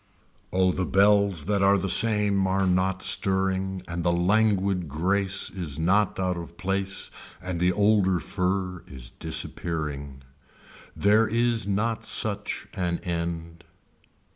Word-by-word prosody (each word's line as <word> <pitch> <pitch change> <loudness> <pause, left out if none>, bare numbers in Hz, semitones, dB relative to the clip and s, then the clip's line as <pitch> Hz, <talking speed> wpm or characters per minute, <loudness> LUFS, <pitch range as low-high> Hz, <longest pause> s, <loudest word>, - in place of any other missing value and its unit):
Oh 95 0 +2
the 90 0 -2
bells 100 -4 +3
that 100 +3 0
are 100 +1 +4
the 95 - -2
same 105 -2 +2
are 95 +1 +1
not 95 +1 0
stirring 95 -1 0
and 85 0 -4
the 85 - +2
languid 95 -1 +1
grace 95 +5 0
is 80 -7 -3
not 95 +6 +1
out 90 -1 -1
of 85 0 -9
place 95 0 -2 0.3
and 90 -1 -5
the 90 +1 +3
older 100 -2 +2
fur 90 0 -2
is 60 -3 -10
disappearing. 70 -5 -2 0.7
There 105 +2 +3
is 115 -1 0
not 110 +3 -1
such 105 -1 -1
an 90 -4 -2
end. 85 -1 -4
95 Hz, 130 wpm, -25 LUFS, 85-100 Hz, 0.7 s, are